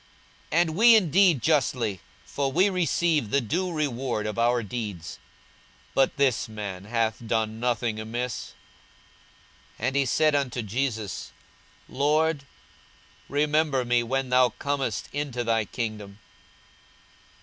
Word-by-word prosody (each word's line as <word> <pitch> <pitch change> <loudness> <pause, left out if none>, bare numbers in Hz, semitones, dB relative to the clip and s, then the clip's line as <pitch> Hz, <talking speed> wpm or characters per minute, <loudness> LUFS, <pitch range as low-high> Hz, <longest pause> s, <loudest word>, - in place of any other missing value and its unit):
42:023:041 165 - +3
And 160 -2 -1
we 230 +4 +7
indeed 180 - +4
justly; 125 - +1 0.3
for 140 +6 -2
we 185 +7 +3
receive 170 - +1
the 140 - +2
due 175 - -2
reward 130 -8 -2
of 105 +1 -3
our 120 0 +2
deeds: 100 -6 -6 0.7
but 135 - +2
this 130 -5 +1
man 100 -3 -6
hath 115 0 0
done 110 -1 -1
nothing 120 -2 -1
amiss. 120 +2 -4 1.3
42:023:042 110 - -3
And 135 - -1
he 140 -1 +3
said 155 +4 +3
unto 130 -4 0
Jesus, 110 -2 -3 0.6
Lord, 150 +1 +1 0.8
remember 150 -2 +1
me 120 0 +2
when 130 +2 -2
thou 125 0 +5
comest 135 -3 -3
into 140 -4 -2
thy 115 -2 +1
kingdom. 105 -3 -5
125 Hz, 125 wpm, -26 LUFS, 110-145 Hz, 1.3 s, we